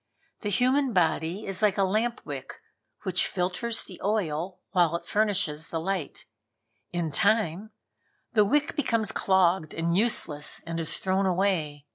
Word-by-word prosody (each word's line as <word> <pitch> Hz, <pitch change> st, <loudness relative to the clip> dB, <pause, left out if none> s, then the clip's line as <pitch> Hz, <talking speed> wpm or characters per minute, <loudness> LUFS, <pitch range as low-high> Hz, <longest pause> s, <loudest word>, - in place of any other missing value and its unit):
The 205 Hz, -, -3 dB
human 255 Hz, +5 st, +2 dB
body 170 Hz, +2 st, 0 dB
is 195 Hz, +1 st, -1 dB
like 210 Hz, -3 st, +3 dB
a 195 Hz, -, +3 dB
lamp 220 Hz, +5 st, 0 dB
wick, -, -, -7 dB, 0.4 s
which 185 Hz, -3 st, +2 dB
filters 190 Hz, +6 st, -1 dB
the 185 Hz, -, -12 dB
oil 185 Hz, -3 st, -1 dB
while 175 Hz, -3 st, +3 dB
it 170 Hz, -, -5 dB
furnishes 200 Hz, -7 st, 0 dB
light. 170 Hz, 0 st, -3 dB, 0.7 s
In 170 Hz, -3 st, -2 dB
time 200 Hz, +2 st, +1 dB, 0.6 s
the 215 Hz, -3 st, +5 dB
wick 295 Hz, +9 st, +1 dB
becomes 230 Hz, -7 st, 0 dB
clogged 185 Hz, -4 st, +2 dB
and 170 Hz, +1 st, 0 dB
useless 180 Hz, -9 st, +2 dB
and 165 Hz, 0 st, -4 dB
is 160 Hz, -, 0 dB
thrown 190 Hz, +1 st, 0 dB
away. 175 Hz, -6 st, 0 dB
190 Hz, 140 wpm, -27 LUFS, 165-215 Hz, 0.7 s, the